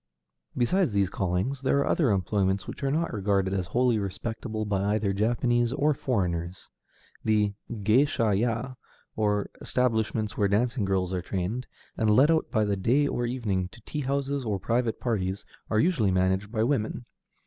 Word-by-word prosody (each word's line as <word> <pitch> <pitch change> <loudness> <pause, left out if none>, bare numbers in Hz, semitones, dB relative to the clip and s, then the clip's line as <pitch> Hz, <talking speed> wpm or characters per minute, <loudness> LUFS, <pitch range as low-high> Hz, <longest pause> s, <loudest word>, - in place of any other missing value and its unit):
Beside 175 +9 +2
these 100 -3 +1
callings, 95 +9 -1
there 135 +1 +2
are 140 - +2
other 150 -7 +2
employments 95 0 +1
which - - -8
are 135 - +1
not 160 +2 0
regarded 100 -2 0
as 95 -3 -1
wholly 120 +4 +2
respectable 110 +2 -4
by 100 0 0
either 105 -2 0
Japanese 120 +3 +1
or 150 +2 +2
foreigners. 90 -9 -2 0.5
The 105 -2 +2 0.2
géisha 110 0 +2
ya, 115 +4 -1 0.4
or 105 -2 0
establishments 110 -3 0
where 100 - +2
dancing 115 +3 +1
girls 95 -1 0
are 90 - -1
trained, 95 +8 -3 0.3
and 110 - +2
let 130 +9 +5
out 160 -1 +1
by 110 -2 +1
the 100 -1 0
day 125 +10 +2
or 120 -3 -1
evening 105 -7 -1
to 115 - -16
tea 150 +7 -4
houses 140 0 -1
or 105 -4 -1
private 115 +3 0
parties, 100 -5 -2 0.2
are 110 - +2
usually 135 - +2
managed 95 +2 +1
by 110 -2 +1
women. 120 -2 -1
110 Hz, 165 wpm, -27 LUFS, 100-125 Hz, 0.5 s, let